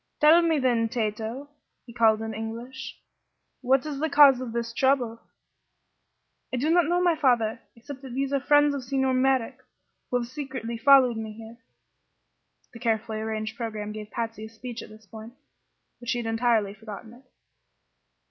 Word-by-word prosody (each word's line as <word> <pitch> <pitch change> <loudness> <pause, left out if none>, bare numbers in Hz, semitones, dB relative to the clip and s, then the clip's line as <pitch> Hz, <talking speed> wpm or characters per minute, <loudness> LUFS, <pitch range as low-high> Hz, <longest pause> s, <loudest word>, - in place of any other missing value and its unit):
"Tell 315 +3 +7
me, 330 -2 +2
then, 240 -4 +1
Tato," 225 +4 -3 0.4
he 235 - -12
called 225 -2 +3
in 220 0 -4
English, 230 +4 -7 0.6
"what 265 +1 +2
is 290 -3 -4
the 315 +2 0
cause 280 -3 +6
of 250 -3 -5
this 235 0 -3
trouble?" 245 -3 +1 1.3
"I 255 - -2
do 295 +6 +1
not 350 0 +4
know, 350 +1 +1
my 350 -2 +3
father, 240 -6 +1
except 265 +3 -10
that 260 -3 -9
these 275 +1 -1
are 275 - +2
friends 290 +1 +4
of 275 -2 -4
Signor 265 +1 0
Merrick 260 -1 +1 0.5
who 250 - +1
have 240 - -2
secretly 255 -4 -6
followed 260 -2 +6
me 220 -1 -5
here." 225 +1 -12 1.2
The 235 - -10
carefully 225 -2 -1
arranged 220 0 -4
programme 215 -3 -5
gave 210 0 -8
Patsy 225 -2 -5
a - - -10
speech 235 +1 -8
at - - -11
this 215 0 -15
point, 220 +2 -11 0.7
but 240 -1 -8
she 245 - +1
had 240 - -4
entirely 225 -3 +1
forgotten 220 +1 -10
it. 245 +2 -17
240 Hz, 170 wpm, -26 LUFS, 225-270 Hz, 1.3 s, Tell